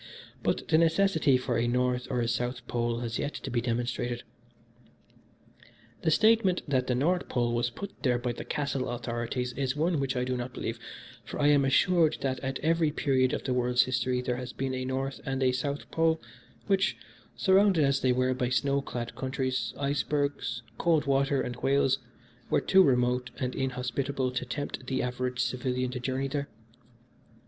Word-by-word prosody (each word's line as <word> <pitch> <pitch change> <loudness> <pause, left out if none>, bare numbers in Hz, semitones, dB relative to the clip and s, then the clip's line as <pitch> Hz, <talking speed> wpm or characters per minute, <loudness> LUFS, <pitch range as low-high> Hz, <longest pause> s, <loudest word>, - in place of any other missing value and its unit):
But - - -1
the 155 - +5
necessity 165 -4 +3
for 125 -2 -1
a 120 - +1
North 125 0 0
or 125 -2 0
a 115 - 0
South 120 +2 -2
Pole 120 0 -1
has 115 -1 -3
yet 145 - -3
to - - -6
be 120 -1 +1
demonstrated. 120 0 -2 1.8
"The - - +1
statement 215 +1 +4
that 130 -3 +1
the 125 - +1
North 175 +8 +1
Pole 120 -1 0
was 120 0 +1
put 200 +11 -9
there 125 -3 +2
by 120 0 -2
the 120 - -6
Castle 140 -3 -2
authorities 120 +1 -3
is 135 0 -1
one 160 +1 +1
which 135 -1 -1
I 125 - 0
do 125 0 -1
not 125 0 -5
believe, - - -4 0.4
for - - -7
I 145 0 +4
am 145 -1 +5
assured 160 +4 +3
that 130 -1 -1
at 135 0 -3
every 165 0 +3
period 130 -4 +1
of - - -2
the 130 - -1
world's 125 0 +3
history 130 -1 0
there 125 -1 -1
has 125 0 -6
been 135 -1 -2
a 130 0 -3
North 135 0 -3
and 135 0 -1
a 130 - +4
South 140 +3 -3
Pole, 160 0 +2 0.5
which, 195 -1 +2 0.4
surrounded 190 -4 +4
as 140 -1 +2
they 130 - +3
were 130 +1 +2
by 125 -1 -1
snow 140 +2 +1
clad 120 -3 -5
countries, 130 -1 -2
icebergs, 140 -3 -1 0.2
cold 165 -3 +2
water 140 0 +2
and 120 0 -5
whales, 135 +1 +2 0.5
were - - +3
too 190 - +5
remote 125 -4 +2
and 125 -1 -2
inhospitable 130 0 -2
to 130 0 -3
tempt 140 -1 -5
the 130 0 0
average 125 0 -2
civilian 125 0 -1
to 125 - -4
journey 130 +2 -1
there. 140 +1 -3
130 Hz, 180 wpm, -29 LUFS, 125-140 Hz, 1.8 s, the